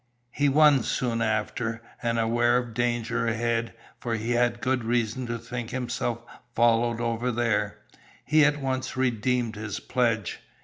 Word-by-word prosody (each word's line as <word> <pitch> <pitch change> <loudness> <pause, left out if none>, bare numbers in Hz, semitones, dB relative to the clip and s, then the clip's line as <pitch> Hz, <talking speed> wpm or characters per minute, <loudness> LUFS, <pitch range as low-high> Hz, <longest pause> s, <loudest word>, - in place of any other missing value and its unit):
He 145 +3 +2
won 145 -1 +5
soon 115 -1 -1
after, 115 +1 -1 0.2
and 115 -1 0
aware 120 +2 +3
of 120 -2 -3
danger 120 -1 0
ahead, 115 0 -1 0.2
for 115 -1 -2
he 110 +2 -3
had 120 0 +2
good 130 0 0
reason 120 +1 -1
to 115 0 -2
think 115 0 -6
himself 120 -2 -3 0.3
followed 120 0 +3
over 120 +1 -1
there, 110 -3 0 0.5
he 155 0 +5
at 150 0 +3
once 130 -1 -3
redeemed 125 -2 0
his 105 0 -5
pledge. 115 -6 -1
120 Hz, 145 wpm, -26 LUFS, 115-125 Hz, 0.5 s, won